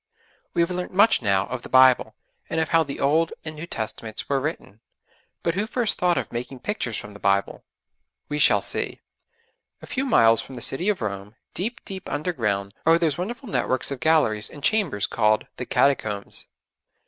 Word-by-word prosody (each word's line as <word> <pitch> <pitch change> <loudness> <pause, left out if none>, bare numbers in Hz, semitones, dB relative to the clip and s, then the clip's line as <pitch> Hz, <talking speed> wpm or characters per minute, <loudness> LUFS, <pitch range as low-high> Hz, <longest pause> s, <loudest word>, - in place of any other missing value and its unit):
We 170 - +4
have 170 - -2
learnt 180 0 -3
much 205 -3 +5
now 100 -3 +2
of 125 0 -5
the - - -10
Bible, 130 -1 +5 0.3
and 160 - -1
of 160 - 0
how 165 -1 +4
the 140 -3 -4
Old 160 +4 +2
and 160 - -2
New 155 +2 -8
Testaments 110 -2 -5
were 140 -1 +1
written, 130 -7 -5 0.6
but 170 - +1
who 205 +4 -1
first 240 -2 0
thought 180 -1 +2
of - - -3
making 125 +2 -6
pictures 125 - -2
from 105 - -8
the 100 - -12
Bible? 100 0 0 0.6
We 150 - -3
shall - - +5
see. - - -2 0.8
A - - -11
few 270 +1 -2
miles 115 - +5
from 135 - -10
the 120 - -8
city 175 +10 +1
of 205 -8 0
Rome, 100 0 -5 0.2
deep, 225 +7 -4
deep 190 -1 -7
underground, 110 - -2
are 165 +1 +5
those 165 -2 0
wonderful 235 +7 -5
networks 130 - 0
of 140 - -4
galleries 135 -10 +2
and 145 - -12
chambers 195 - +1
called 105 0 +1
'The 125 - -5
Catacombs.' 110 -8 0
140 Hz, 185 wpm, -24 LUFS, 110-175 Hz, 0.8 s, much